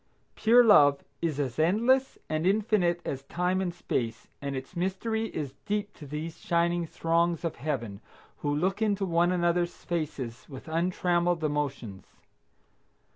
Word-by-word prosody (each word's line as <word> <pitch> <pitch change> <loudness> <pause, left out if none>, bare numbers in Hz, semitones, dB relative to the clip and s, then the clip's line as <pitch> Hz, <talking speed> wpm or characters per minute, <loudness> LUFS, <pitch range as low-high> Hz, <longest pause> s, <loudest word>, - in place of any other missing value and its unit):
Pure 240 +2 +5
love 145 -11 +6 0.2
is 160 -4 -1
as 135 -2 -2
endless 235 +11 +3
and 155 +3 0
infinite 200 -4 +2
as 135 - -3
time 180 +6 -1
and 180 -2 -1
space, 115 -9 -3
and 140 -1 -3
its 130 +7 -7
mystery 195 +5 -1
is 145 -9 -5
deep 205 0 -1
to 150 - -11
these 155 +3 -5
shining 170 0 +1
throngs 170 +1 0
of 165 - -3
Heaven 120 -7 -3 0.4
who 145 - -2
look 185 +8 0
into 205 -2 +1
one 170 0 +2
another's 175 -1 0
faces 145 -8 -4
with 135 +1 -10
untrammeled 175 0 +1
emotions. 140 -9 -3
170 Hz, 140 wpm, -28 LUFS, 145-185 Hz, 0.4 s, love